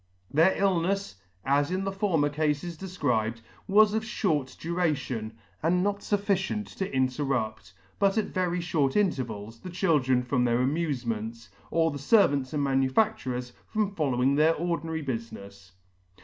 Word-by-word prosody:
Their 165 +6 +4
illnefs, 195 - 0 0.3
as 140 +2 +2
in 185 +1 -1
the 195 - -1
former 190 -7 +1
Cafes 150 +3 -1
defcribed, 125 - -1 0.3
was 210 +1 +5
of 220 - +1
fhort 155 - -1
duration, 145 -10 -2 0.2
and 180 +3 +2
not 200 0 0
fufficient 205 0 -1
to 190 - -2
interrupt, 130 -6 -1 0.3
but 200 +1 +3
at 220 - 0
very 180 -2 0
fhort 155 -5 0
intervals, 115 - -1
the 185 - -8
children 150 -9 +2
from 125 0 +1
their 120 -1 +2
amufements, 120 -6 -2 0.2
or 165 -1 +2
the 145 - -6
fervants 140 - +3
and 150 -2 -1
manufacturers 135 - 0
from 210 -2 -1
following 135 -6 +1
their 155 +3 +4
ordinary 165 -1 -2
bufinefs.. 100 -6 -7
150 Hz, 135 wpm, -27 LUFS, 125-185 Hz, 0.3 s, was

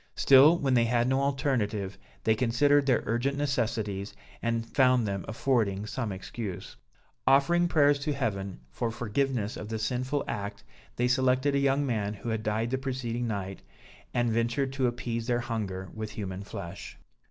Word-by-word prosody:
Still 140 +5 +7
when 135 -5 +1
they 120 -2 +4
had 120 +1 +2
no 130 +1 +2
alternative, 125 -8 -1 0.3
they 110 - +4
considered 140 +5 +3
their 125 -3 +3
urgent 130 +5 0
necessities 110 -8 -1 0.3
and 115 -1 -1
found 125 -1 +3
them 100 -1 -2
affording 110 -4 0
some 115 -1 -3
excuse. 95 +1 -6 0.5
Offering 170 +6 +4
prayers 145 -4 +4
to 145 +1 -1
Heaven 100 - -3
for 115 - -2
forgiveness 120 -1 -1
of 105 - -7
the 110 - -2
sinful 130 +5 -1
act, 100 0 -4 0.3
they 125 - +1
selected 130 +2 +2
a 140 - +2
young 140 +1 +2
man 105 -5 -1
who 105 +4 -6
had 110 -1 -1
died 110 +2 -1
the 130 - 0
preceding 125 -3 -3
night, 95 -3 -4 0.5
and 120 -1 +1
ventured 120 +4 0
to 135 -2 +1
appease 120 -1 -3
their 120 -1 +1
hunger 100 -6 -4
with 110 -1 -5
human 95 -2 -5
flesh. 85 -3 -8
120 Hz, 165 wpm, -28 LUFS, 105-135 Hz, 0.5 s, Still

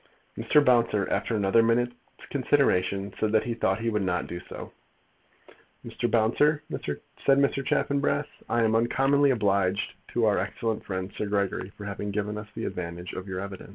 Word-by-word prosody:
Mr. 150 -1 +3
Bouncer, 115 -5 +3
after 115 - 0
another 105 +2 +4
minute's 120 +2 +2 0.4
consideration, 100 -8 +1
said 110 - +1
that 110 - +4
he 120 - -2
thought 110 -2 0
he 115 - 0
would 105 -1 0
not 90 -2 0
do 85 - -6
so. - - -9 1.1
"Mr. 120 - -2
Bouncer," 145 +7 +3 0.6
said 135 -1 +5
Mr. 140 0 +2
Chaffanbrass, 145 0 +1 0.2
"I 115 0 +2
am 110 0 +2
uncommonly 135 +5 +3
obliged 100 -5 +1 0.2
to 120 -1 +2
our 105 -2 +3
excellent 110 +3 -2
friend, 95 0 -4
Sir 105 - -2
Gregory, 100 -1 -1
for 105 - -8
having 100 +1 -4
given 105 +1 -2
us 105 - -9
the - - -4
advantage 85 0 -5
of 95 +1 -6
your 95 -1 -4
evidence." 100 -1 -8
105 Hz, 170 wpm, -27 LUFS, 100-120 Hz, 1.1 s, said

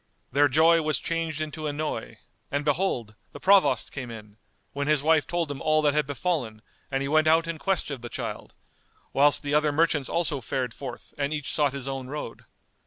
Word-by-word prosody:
Their 145 +3 +4
joy 160 +4 +5
was 155 -3 +1
changed 165 -2 -2
into 155 0 -4
annoy, 150 +1 -4 0.3
and 145 +1 -2
behold, 145 - 0 0.2
the - - -9
Provost 195 0 +4
came 130 -4 -6
in, 105 -2 -10 0.4
when 140 0 -2
his 150 -2 +2
wife 160 -1 +3
told 170 -4 -1
him 140 - -6
all 155 -1 +2
that 145 -1 +3
had 150 -1 +1
befallen 140 -8 -2 0.3
and 135 0 -1
he - - -2
went 155 +2 +3
out 165 +1 +4
in 165 -1 -4
quest 195 -5 -1
of 135 -4 -5
the 120 - -7
child, - - -6 0.6
whilst 145 +1 +4
the 145 0 -2
other 150 0 +3
merchants 150 -2 +1
also 150 -5 -1
fared 125 +1 -2
forth 130 -3 -8
and 140 0 0
each 150 -3 -3
sought 145 -3 +2
his 135 -1 -5
own 135 -1 -4
road. 150 +3 -7
145 Hz, 200 wpm, -26 LUFS, 135-155 Hz, 0.6 s, joy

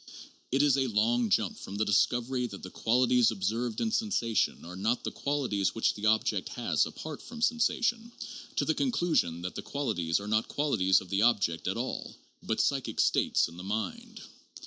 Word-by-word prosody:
It 135 +3 +3
is 140 -2 +4
a 135 -1 +1
long 115 +1 +1
jump - - +1
from 100 - -8
the 110 +2 0
discovery 120 +6 +1
that 100 -4 -10
the 90 - -8
qualities 125 0 +3
observed 110 +3 -2
in 225 - 0
sensation 200 - 0
are 90 +2 -8
not 110 +6 -1
the - - -3
qualities 125 -10 -1
which 115 - +2
the 105 +1 -2
object 110 0 +1
has - - 0
apart 155 -2 -8
from 235 -1 -10
sensation, 235 0 +1 0.4
to - - +1
the - - +2
conclusion 170 - 0
that 90 - -4
the - - -5
qualities 100 - -1
are 100 - -7
not 110 +1 +1
qualities 110 -11 +2
of 95 - -12
the 95 +2 +1
object 100 -8 +2
at - - -1
all - - -4 0.3
hut - - 0
"psychic - - -1
states" - - +3
in 85 +1 -13
the 90 - -8
mind. 220 - -4
115 Hz, 185 wpm, -29 LUFS, 100-145 Hz, 0.4 s, is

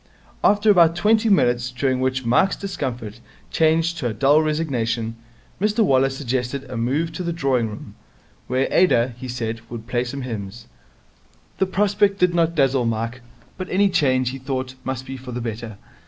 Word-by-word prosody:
After 205 +1 +4
about 170 -4 +5
twenty 220 +4 +3
minutes, 125 -10 +2
during 130 +1 -1
which 130 0 -1
Mike's 155 +12 +3
discomfort 125 - -5 0.3
changed 165 +1 +2
to 125 - -1
a 110 - -3
dull 140 +5 +4
resignation, 120 -8 -1 0.5
Mr 210 +2 +2
Waller 135 -3 +3
suggested 135 0 -3
a - - -7
move 135 +8 -1
to 180 - -6
the 170 -1 -2
drawing 135 -8 0
room, 105 -1 -9 0.5
where 130 +2 +1
Ada, 125 -9 +3
he 130 - -7
said, 115 -2 -4
would 115 -2 -7
play 120 0 -1
some 130 +2 -5
hymns. 115 -1 -6 0.9
The 190 - +2
prospect 200 +1 +2
did 180 -2 +2
not 170 -1 +1
dazzle 135 -4 +2
Mike, 115 +2 -3 0.4
but 185 - -5
any 200 +2 +3
change, 130 -8 +2
he 135 - -7
thought, 130 -1 -4
must 130 -1 -4
be 135 0 -6
for 125 -1 -9
the 120 - -3
better. 115 -2 -6
130 Hz, 170 wpm, -22 LUFS, 120-170 Hz, 0.9 s, about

